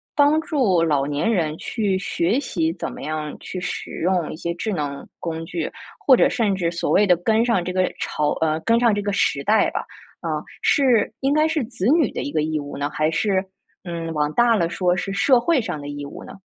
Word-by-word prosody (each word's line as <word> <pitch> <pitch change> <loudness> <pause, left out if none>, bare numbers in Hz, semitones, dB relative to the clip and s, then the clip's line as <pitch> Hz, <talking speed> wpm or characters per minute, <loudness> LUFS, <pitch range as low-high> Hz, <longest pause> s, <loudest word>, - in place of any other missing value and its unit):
帮 295 +2 +4
助 255 - +1
老 145 -4 +2
年 145 +10 0
人 160 -7 0
去 210 -5 -1
学 190 +5 0
习， 165 - -1
怎 175 - -5
么 - - -9
样 155 0 -4
去 185 - -6
使 180 - -5
用 180 -1 +1
一 - - -6
些 170 +1 -3
智 210 +4 -3
能 145 -4 -4
工 165 -1 -4
具， 165 -1 -4 0.3
或 260 -3 +6
者 - - +5
甚 220 -5 0
至 170 -3 -1
所 170 - -2
谓 210 - +4
的 180 -3 +5
跟 220 +6 +2
上 230 -7 +1
这 180 - -3
个 185 0 +2
潮 150 -1 -1
呃， 160 0 +1
跟 230 +4 +3
上 235 -2 +4
这 205 0 -1
个 205 0 -1
时 140 -7 +1
代 215 +6 +3
吧， - - -3 0.4
啊， - - -2 0.2
是 250 -7 +3
应 270 +1 +1
该 305 +2 +3
是 315 -3 0
子 225 -5 -5
女 310 -4 +3
的 - - -4
一 145 - -4
个 155 - +1
义 155 0 -1
务 145 0 -7
呢？ 145 +1 -2
还 155 +1 0
是， 190 +2 +1 0.4
嗯， 170 -2 -4
往 150 0 0
大 240 +3 +4
了 170 -5 +1
说 180 +1 0
是 195 +2 -3
社 250 +5 +4
会 280 +2 +2
上 155 - -4
的 145 - -8
义 145 0 -6
务 - - -10
呢？ - - -10
185 Hz, 250 characters per minute, -22 LUFS, 155-230 Hz, 0.4 s, 或